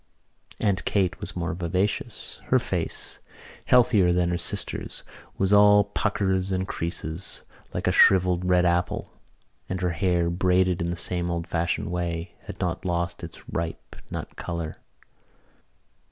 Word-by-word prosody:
Aunt 100 -3 +1
Kate 95 -4 0
was - - -6
more 90 0 -2
vivacious. 90 +4 -2
Her - - +4
face, - - -3 0.5
healthier 110 -7 +5
than 90 0 +2
her 85 - 0
sister's, 85 - -1 0.3
was 95 +1 +2
all 105 0 +7
puckers 95 -2 0
and 95 0 -1
creases, 85 +1 -3 0.3
like - - -3
a - - +3
shrivelled 90 -1 +5
red 90 0 +3
apple, 90 +1 0 0.6
and 95 - -2
her 90 -1 +1
hair, 85 -1 +1
braided 90 0 +2
in 85 - -1
the 85 - -3
same 85 0 +2
old 85 -1 -2
fashioned 85 0 -1
way, 85 0 -3
had - - -8
not - - -2
lost 85 -1 -2
its 85 - -10
ripe 80 0 -5
nut - - -6
colour. 85 -2 -5
90 Hz, 140 wpm, -26 LUFS, 85-95 Hz, 0.6 s, all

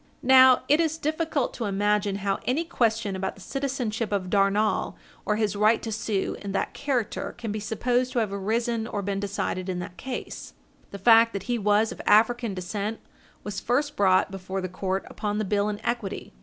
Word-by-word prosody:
Now 260 0 +7
it 295 +3 +4
is 320 -1 0
difficult 315 -3 -1
to 235 - -4
imagine 205 0 +1
how 195 -1 0
any 270 +7 +1
question 225 - 0
about 190 0 -3
the 195 - -15
citizenship 250 -4 -3
of 190 -3 -2
Darnall, 205 +1 +2 0.3
or 210 - +2
his 210 -2 0
right 215 +2 +4
to 225 - -4
sue 215 -2 -2
in 200 -1 -5
that 195 - -1
character, 260 -6 -2
can 230 -3 -4
be 215 - -3
supposed 245 +4 0
to - - -3
have 215 -4 0
arisen 225 +3 -1
or 205 -3 -3
been 195 0 -2
decided 195 -2 -3
in 185 - -2
that 180 0 -7
case. 255 +4 -6 0.3
The 200 - -7
fact 230 +3 +6
that 200 -2 -4
he 240 +2 -1
was 210 +1 +2
of - - -7
African 225 0 +3
descent 200 +4 -4 0.4
was 205 -1 -4
first 290 +5 0
brought 190 -1 +3
before 190 0 -5
the 185 - -3
court 190 +1 -3
upon 210 -1 -3
the 215 - -1
bill 205 +1 +1
in 205 -1 -4
equity. 235 - -3
210 Hz, 195 wpm, -26 LUFS, 200-240 Hz, 0.4 s, Now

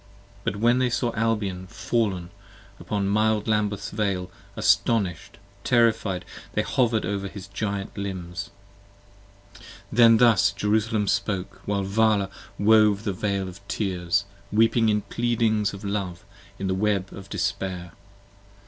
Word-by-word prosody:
p. - - +1
20 100 - -6
BUT - - -5
when 120 +1 +5
they 130 -1 +2
saw 120 0 -1
Albion 105 -5 -1
fall'n, 95 -5 -1 0.5
upon 100 -2 -2
mild 110 +1 +2
Lambeth's 105 -2 0
vale: 100 -4 -1 0.2
Astonish'd, 95 -9 +1 0.3
Terrified, 110 -6 +2 0.3
they - - +1
hover'd 115 -5 +1
over 100 +1 -2
his 100 -1 -9
Giant 100 0 -4
limbs. 95 -2 -5 1.4
Then 115 0 +7
thus 105 -5 +5
Jerusalem 105 +1 0
spoke, 100 -1 -1
while 100 -1 0
Vala 100 0 +2 0.3
wove 105 -1 +4
the 100 - -1
veil 100 0 -1
of 95 +1 -9
tears: 95 -1 0 0.3
Weeping 115 +1 +3
in 105 0 +2
pleadings 110 -3 0
of 100 0 -9
Love, 100 -4 -3 0.3
in 95 - -4
the 95 - 0
web 100 -1 0
of 100 0 -10
despair. 90 -4 -3
100 Hz, 130 wpm, -25 LUFS, 95-110 Hz, 1.4 s, Then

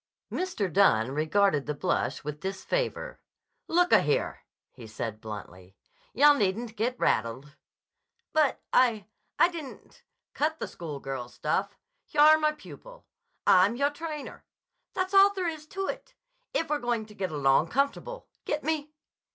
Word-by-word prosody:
Mr. 365 - -2
Dunne 130 - +4
regarded 155 +1 +1
the 150 - -2
blush - - -1
with 150 0 -5
disfavor. 195 - -3 0.5
"Look 355 +2 +3
a - - +7
here," - - 0 0.3
he 120 -4 -11
said 110 0 -5
bluntly. 95 -4 -9 0.4
"Yah, 290 +3 +6
needn't 220 -1 -1
get 240 +4 -1
rattled." 130 +7 -1 0.8
"But—I—I—didn't—" 265 - 0 0.3
"Cut 315 +2 0
the - - -4
school 155 -5 -7
girl 135 -3 -5
stuff. 190 +10 -2 0.3
Yah'r 305 +1 +6
my 305 0 +2
pupil. - - -13 0.4
I'm 190 +5 +5
yahr 280 +3 +1
trainer. 305 -1 -7 0.5
That's 370 +1 -1
all 395 +1 +7
there 370 -2 -1
is 310 -2 -5
to 390 +4 -4
it, - - -6 0.4
if 325 -2 -1
we're 300 - +1
going 240 -3 -1
to 215 - -15
get 190 -2 -3
along 140 +1 +3
comfortable. 280 - -2 0.2
Get 300 - -2
me?" 305 -1 -2
230 Hz, 135 wpm, -28 LUFS, -, 0.8 s, a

